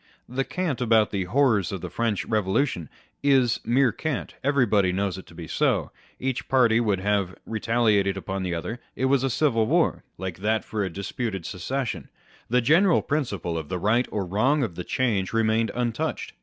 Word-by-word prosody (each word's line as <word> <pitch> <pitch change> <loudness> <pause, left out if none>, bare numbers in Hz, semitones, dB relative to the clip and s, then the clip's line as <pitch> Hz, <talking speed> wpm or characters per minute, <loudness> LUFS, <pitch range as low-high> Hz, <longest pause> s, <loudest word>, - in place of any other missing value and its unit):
The 130 +2 -1
cant 165 -5 -2
about 110 -3 +3
the 95 -3 -1
horrors 110 -2 +2
of 95 -3 -4
the 90 - -5
French 115 +1 -1
Eevolution 105 - 0 0.3
is 135 -4 +3
mere 125 +1 +3
cant 145 +5 -3
â€" - - -25
everybody 120 -9 +3
knows 95 0 -1
it - - -13
to 85 - -15
be 85 0 -7
so; - - +1 0.3
each 130 +1 -2
party 120 -4 +4
would 105 -5 +1
have 100 -2 0
retaliated 110 -3 +1
upon 95 0 -4
the 90 -2 -2
other: 110 +8 -4 0.2
it 130 - -1
was 135 0 +3
a 135 - +1
civil 115 -4 +2
war, - - +2
like 95 -2 -5
that 110 +2 0
for 105 -2 -2
a 95 - -2
disputed 100 +1 -4
succession; 105 - -3 0.4
the 125 +2 +3
general 165 +9 +4
principle 100 - -2
of 75 - -8
the 90 - -2
right 110 +7 +2
or 100 -3 -2
wrong 125 - +2
of 105 -8 -2
the 90 - -5
change 105 -6 0
remained 115 0 +2
untouched. 120 -2 -2
110 Hz, 185 wpm, -25 LUFS, 95-130 Hz, 0.4 s, party